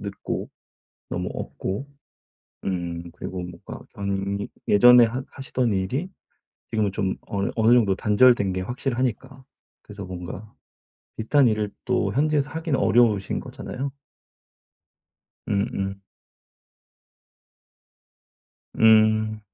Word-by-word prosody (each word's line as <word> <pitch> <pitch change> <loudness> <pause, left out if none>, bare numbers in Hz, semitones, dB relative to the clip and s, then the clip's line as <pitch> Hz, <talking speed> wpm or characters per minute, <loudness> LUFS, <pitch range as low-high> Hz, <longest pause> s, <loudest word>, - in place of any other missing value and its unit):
늦고 100 0 -5 0.6
너무 - - -3
없고 100 +9 -5 0.8
음 85 -2 -3
그리고 90 +1 -6
뭔가 90 -1 -9
당연히 100 0 -2 0.2
예전에 120 +4 +8
하 125 +4 -4
하시던 130 -3 -1
일이 115 - -2 0.6
지금은 110 -3 0
좀 95 -1 -1
어느 100 -1 -1
어느 115 +1 +4
정도 110 -6 +4
단절된 105 -2 +4
게 95 - -2
확실하니까. 130 +3 -3 0.4
그래서 105 -1 -9
뭔가 90 +3 -8 0.6
비슷한 130 +5 +3
일을 105 -2 0 0.2
또 - - +1
현지에서 145 0 +1
하긴 160 -2 -1
어려우신 115 -6 +2
거잖아요. 135 +2 -6 1.6
음음. 100 -1 -1 2.7
음. 110 -1 +4
110 Hz, 220 characters per minute, -24 LUFS, 95-125 Hz, 2.7 s, 예전에